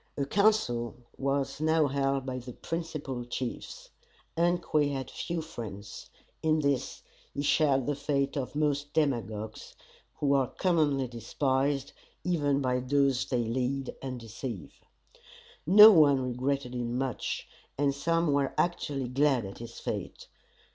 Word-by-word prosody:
A 140 - 0
council 140 - +2 0.2
was 140 +1 -1
now 160 0 +3
held 135 -1 0
by 130 -1 -3
the 125 0 -9
principal 150 -7 -4
chiefs. 120 0 -6 0.4
Ungque 170 -4 +2
had 135 -2 -4
few 170 -2 -3
friends. 110 -9 -8 0.3
In 155 0 +2
this, 140 -3 -1 0.3
he 140 - -2
shared 140 -3 +3
the 145 - 0
fate 140 -1 -1
of 135 -1 -3
most 145 -1 0
demagogues, 110 -7 -2 0.4
who 140 -1 +1
are 135 -2 +3
commonly 150 -7 +1
despised 135 +4 -1 0.3
even 145 -5 +1
by 125 -1 +1
those 135 0 +1
they 125 -3 0
lead 130 +3 -2
and 130 -2 -5
deceive. 115 - -7 0.9
No 210 +5 +11
one 145 -7 +6
regretted 130 +1 -2
him 120 0 -2
much, 130 -2 -3 0.3
and 140 0 +2
some 165 +2 +1
were 140 -1 0
actually 145 -6 -1
glad 135 -2 +2
at 95 - -9
his 115 0 -9
fate. - - -5
140 Hz, 135 wpm, -29 LUFS, 125-150 Hz, 0.9 s, No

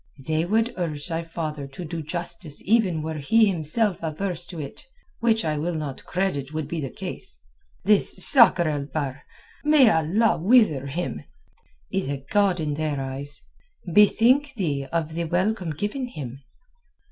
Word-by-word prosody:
They 160 +1 0
would 225 +5 +1
urge 155 -3 -3
thy 165 0 -1
father 155 -4 -5
to 140 +6 -8
do 165 +1 -4
justice 170 0 -4
even 190 -7 +2
were 160 -1 -4
he 220 +11 +4
himself 190 +2 0
averse 170 +2 -3
to 170 - -8
it, 140 - -8 0.3
which 225 -4 +2
I 155 -1 -1
will 170 +3 -2
not 150 -4 -5
credit 175 -7 -2
would 155 -2 -3
be 165 +1 -3
the 135 - -3
case. - - -6 0.5
This 205 +1 +4
Sakr 230 - +6
el 145 -2 -1
Bahr—may 155 - +1
Allah 175 +8 +2
wither 180 - +4
him!—is 135 - -6
a 140 -1 -4
god 200 -3 +3
in 150 -2 -1
their 150 -1 -2
eyes. 135 +2 -6 0.5
Bethink 250 - +4
thee 145 -9 -2
of 160 -2 -1
the 170 +1 -2
welcome 185 +2 0
given 205 - -3
him! 135 - -8
165 Hz, 150 wpm, -24 LUFS, 145-200 Hz, 0.5 s, Sakr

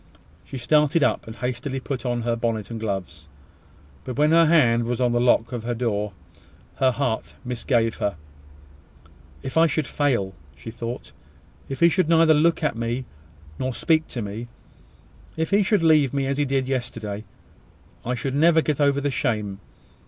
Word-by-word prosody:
She 135 - -8
started 150 +5 +3
up, - - 0
and 110 - -8
hastily 130 +2 -3
put 130 -1 -4
on 120 -1 -1
her 120 0 0
bonnet 115 -2 -2
and 115 - -4
gloves: 90 -6 -5 0.8
but 125 - -6
when 150 +1 +3
her 165 0 +6
hand 120 -8 +4
was 120 +1 -2
on 125 -1 +2
the 120 - +1
lock 120 -1 +3
of 120 -3 -4
her 120 +1 -2
door, 105 -4 -1 0.6
her 130 - +4
heart 130 -3 -2
misgave 120 -2 0
her. 100 -3 -1 1.3
"If 130 - -6
it 165 +1 +6
should 155 -2 -1
fail!" 120 -12 0 0.2
she 70 +10 -8
thought. 120 +1 -6 0.6
"If 135 - -5
he 170 - +7
should 180 -2 +1
neither 165 -1 +5
look 165 +2 +2
at 150 - +1
me 120 +3 -3 0.5
nor 130 -1 -2
speak 160 -1 +2
to 120 - -5
me 105 +4 -6 0.9
if 160 +2 -1
he 200 +1 +4
should 200 -2 +2
leave 150 -4 +4
me 135 -1 0
as 140 +1 -1
he 145 - +2
did 135 -1 0
yesterday! 110 -5 -3 0.8
I 125 +2 -1
should 130 +3 -3
never 160 +3 +4
get 150 -1 -1
over 140 -1 +3
the 140 0 -1
shame. 105 -7 -2
125 Hz, 175 wpm, -24 LUFS, 115-150 Hz, 1.3 s, he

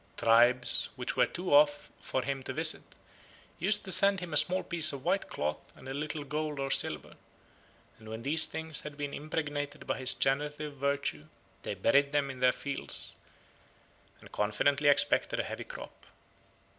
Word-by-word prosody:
Tribes 120 +2 +4
which - - -4
were - - +3
too 180 - -6
far 145 - +9
off 145 -1 0
for 130 - -2
him 135 0 -3
to 130 - -6
visit 160 +3 +2 0.8
used 205 +5 +1
to 190 - -5
send 195 +1 +5
him 175 -3 -7
a - - -1
small 180 +5 +3
piece 170 -3 +3
of 140 -1 -8
white 195 - 0
cloth 75 +1 -3
and 130 - -13
a 135 - -4
little 150 +1 -4
gold 150 0 -3
or 135 0 -2
silver, - - -1 0.9
and 110 -1 -12
when 110 +1 -7
these 160 +4 +2
things 160 -1 -2
had 150 -1 -9
been 145 -1 -4
impregnated 145 -1 -4
by - - -2
his 130 -1 +1
generative 150 +2 -1
virtue 140 - -2 0.3
they - - -4
buried 140 +1 +2
them 140 -2 +1
in 130 - -11
their 125 0 +5
fields, 140 +1 -4 1.0
and - - -16
confidently 140 +8 +1
expected 145 0 +3
a - - +1
heavy - - -6
crop. - - -11
145 Hz, 175 wpm, -30 LUFS, 130-155 Hz, 1.0 s, far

